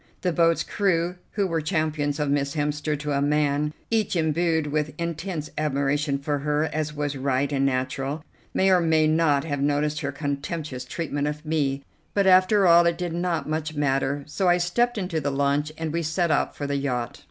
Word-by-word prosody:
The 180 -1 0
boat's 165 0 +3
crew, 180 -3 0 0.2
who 200 -2 +1
were 165 -3 -1
champions 155 -3 -1
of 150 - 0
Miss 140 0 0
Hemster 150 0 -1
to 145 +1 -4
a 140 -1 +1
man, 150 0 +1 0.2
each 220 -4 +1
embued 160 0 +1
with 150 0 -2
intense 170 -1 -4
admiration 145 -1 0
for 145 +1 -2
her, 150 +1 0
as 155 -1 -1
was 145 -1 -2
right 135 +1 0
and 135 0 +2
natural, 135 +3 -2 0.3
may 190 0 +3
or 185 - +5
may 160 -2 +3
not 155 -3 +3
have 145 -3 -3
noticed 145 +1 +1
her 140 - -2
contemptuous 145 -1 -4
treatment 145 0 -3
of 150 +1 -5
me; 140 -3 0 0.3
but 200 -1 +3
after 190 +2 +5
all 170 0 +6
it 170 - +1
did 175 -2 -3
not 175 -1 -1
much 155 0 -3
matter, 140 0 0
so 180 +5 0
I 175 - +5
stepped 235 +8 +1
into 180 -5 -2
the 140 - -1
launch 140 +2 0
and 160 -1 -3
we 170 - 0
set 165 +1 0
out 145 - +1
for 145 - -4
the 140 0 -1
yacht. 125 -4 -2
150 Hz, 195 wpm, -25 LUFS, 145-170 Hz, 0.3 s, all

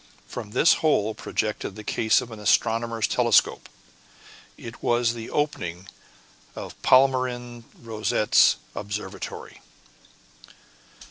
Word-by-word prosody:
From 110 -4 -8
this 160 +11 +4
hole 110 -9 +2
projected 105 -2 -3
the 105 - -9
case 110 +1 +2
of 120 - -9
an 110 - -9
astronomer's 115 +1 +1
telescope; 120 -3 +2 0.9
it - - -10
was 120 -1 +1
the 115 -1 -8
opening 95 - -3 0.7
of - - -7
Palmyrin 125 -2 +2
Rosette's 110 -2 +2 0.2
observatory. 100 -1 -7
115 Hz, 95 wpm, -24 LUFS, 105-120 Hz, 0.9 s, this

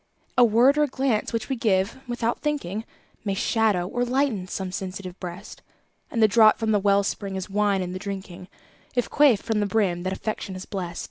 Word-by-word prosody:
A 250 - +6
word 240 +6 +5
or - - +5
a - - -4
glance 260 -5 0
which 230 -2 -2
we 270 - -1
give 205 -1 +1
"without 240 -1 -1
thinking", 225 - -2 0.4
May 200 -2 -1
shadow 210 -4 +1
or 245 +5 -1
lighten 245 -6 0
some 185 0 -4
sensitive 185 -1 -6
breast; 180 +2 -8 0.5
And 230 - +1
the - - +8
draught 215 0 +6
from 220 -1 0
the 210 - +3
well 200 0 +3
spring 195 0 -3
is 190 +1 -5
wine 200 -2 +1
in 180 0 -5
the 185 - -5
drinking, 190 -2 -7 0.5
If 245 - 0
quaffed 280 -8 +4
from 225 -2 0
the 205 - +1
brim 195 -5 +1
that 185 +1 -2
Affection 200 -1 -4
has 185 - -7
blest. 175 -4 -5
205 Hz, 205 wpm, -25 LUFS, 190-235 Hz, 0.5 s, the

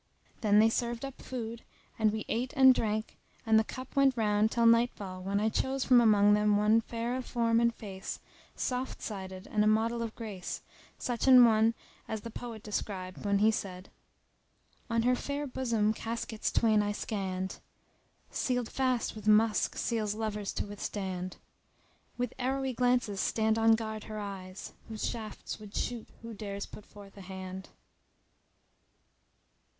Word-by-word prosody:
Then 210 -2 +4
they 220 +1 +6
served 235 +2 -2
up 275 - -9
food, 235 -2 -5 0.4
and 215 -1 +4
we 215 0 -4
ate 245 +3 -2
and 265 -1 +9
drank 215 -2 -2 0.3
and 220 -1 +5
the - - +3
cup 255 +3 -8
went 275 -2 +4
round 210 -1 +3
till 235 0 +1
nightfall 230 -5 +2
when 195 +2 0
I 215 - +2
chose 265 +4 -1
from 250 -2 +6
among 205 -2 +5
them 210 0 +3
one 215 +2 +4
fair 235 +2 -3
of 255 -1 -4
form 230 -1 +2
and 235 0 +3
face, 195 -4 -7 0.4
soft 255 +1 -3
sided 190 -2 -6
and 210 -1 +3
a - - +3
model 225 +2 +2
of 225 -1 -4
grace, 205 -6 -6 0.3
such 245 +1 -2
an 255 -2 +9
one 225 0 +4 0.3
as 220 -1 -3
the 230 - -7
poet 225 -2 -7
described 190 -3 -4
when 200 0 +3
he 215 +2 +5
said.— 185 -3 -5 1.0
On 230 0 +1
her 250 +1 +4
fair 285 +3 -3
bosom 235 -5 0
caskets 225 -1 -3
twain 220 -2 +4
I 205 0 -1
scanned, 190 -3 -3 0.4
* - - -39
Sealed 245 -3 -1
fast 255 -3 0
with 215 -1 -8
musk 215 +1 +3
seals 215 -3 -1
lovers 210 -2 -3
to - - -2
withstand 190 -3 -4 0.8
With 245 -1 -2
arrowy 265 +1 -1
glances 245 -4 +1
stand 220 +2 +1
on 225 0 +6
guard 220 -1 -5
her 215 - -6
eyes, 195 -2 -7
* - - -29
Whose 220 -1 -3
shafts 220 -2 -6
would 210 -1 -11
shoot 240 -2 -3
who 230 0 -7
dares 200 -1 -5
put 210 - -12
forth 200 -1 -14
a - - -9
hand. 190 0 -7
220 Hz, 165 wpm, -31 LUFS, 205-235 Hz, 1.0 s, and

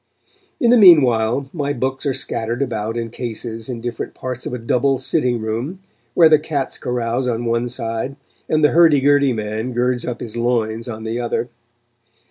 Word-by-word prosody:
In 235 - +3
the 245 - +6
meanwhile, 135 - +5
my 145 -4 -2
books 130 +2 -2
are 135 - +1
scattered 115 +3 -2
about 115 -3 -3
in 115 -1 -4
cases 115 -1 -5
in 120 -2 -5
different 120 -1 -5
parts 125 -1 -5
of - - -5
a - - -3
double 125 +3 +1
sitting 125 -4 0
room, 115 - -3 0.4
where 165 - +7
the 155 -1 +5
cats 150 -3 -3
carouse 125 +1 -2
on 120 -1 -2
one 115 +1 0
side, 115 +2 -4 0.3
and 155 0 +2
the 150 - +5
hurdy 160 -3 +5
gurdy 140 0 +3
man 110 +2 -3
girds 125 0 0
up 125 -1 -4
his 115 -2 -7
loins 115 -1 -1
on 110 -1 -6
the 115 +2 -3
other. 120 0 -2
125 Hz, 180 wpm, -19 LUFS, 115-140 Hz, 0.4 s, where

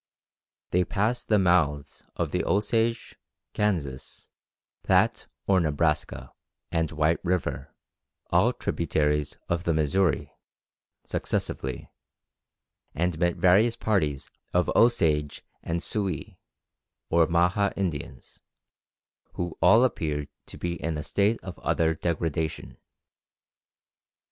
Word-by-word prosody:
They 90 +1 +3
passed 110 +7 -1
the 105 - +4
mouths 80 -7 +1
of - - -2
the - - 0
Osage, 115 +3 0 0.4
Kansas, 80 -11 -3 0.5
Platte - - +2 0.2
or 95 -1 +4
Nebraska, 75 -1 -1 0.4
and 80 -2 0
White 80 +1 +1
River, 90 -1 -2 0.6
all - - +4
tributaries 75 -3 -1
of 85 0 -1
the 85 -3 +1
Missouri, 80 +4 +1 0.7
successively, 65 -2 -3 1.0
and 85 +1 -1
met 85 -1 +2
various 105 +6 +4
parties 85 - -1 0.2
of 90 - +2
Osage 80 -11 +2 0.2
and 85 +1 -3
Sioux, 95 -8 -2 0.8
or 85 -1 +4
Maha 90 +4 +2
Indians, 80 -9 -5 0.9
who 90 -2 -4
all 115 +3 +6
appeared 75 - -1 0.2
to - - -10
be 85 -2 -4
in 80 0 -2
a 75 - -4
state 105 +6 +1
of 95 -2 -8
utter 80 -1 +1
degradation. 80 -1 -3
85 Hz, 105 wpm, -26 LUFS, 75-95 Hz, 1.0 s, all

